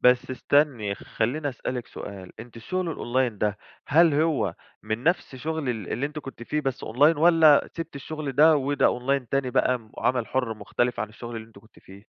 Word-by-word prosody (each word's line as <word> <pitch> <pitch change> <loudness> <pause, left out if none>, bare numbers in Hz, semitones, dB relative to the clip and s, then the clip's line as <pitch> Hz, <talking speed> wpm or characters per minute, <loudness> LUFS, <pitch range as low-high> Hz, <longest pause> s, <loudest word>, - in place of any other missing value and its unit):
بس 125 +1 +4
استني، 130 -6 +1
خلّيني 130 +9 -2
اسألِك 125 -1 -4
سؤال، 95 -3 -9
أنتِ 120 0 -12
الشغل 170 +8 -3
الOnline 125 0 0
ده 105 0 0 0.3
هل 160 +1 +5
هو 155 0 +1 0.3
من 110 +2 -3
نفس 175 -5 0
شغل 155 +1 -3
ال 110 -6 -3
اللي 135 +5 -1
أنتِ 150 +1 -7
كنتِ 135 -5 -9
فيه 150 +5 -1
بس 135 -3 -3
Online 145 +7 +4
والَّا 160 -2 +5
سِبتِ 165 -3 -6
الشغل 145 0 -5
ده 155 +4 +6
وده 140 -2 +1
Online 135 0 -1
تاني 135 -2 0
بقى 125 +1 +2
م 110 -2 -20
وعمل 125 -3 0
حُرّ 125 -4 -1
مختلف 110 +5 -1
عن 110 - -2
الشغل 120 +2 -8
اللي 110 0 -7
أنتِ 110 - -16
كنتِ 110 +2 -21
فيه؟ 100 +2 -15
130 Hz, 195 wpm, -25 LUFS, 115-150 Hz, 0.3 s, ده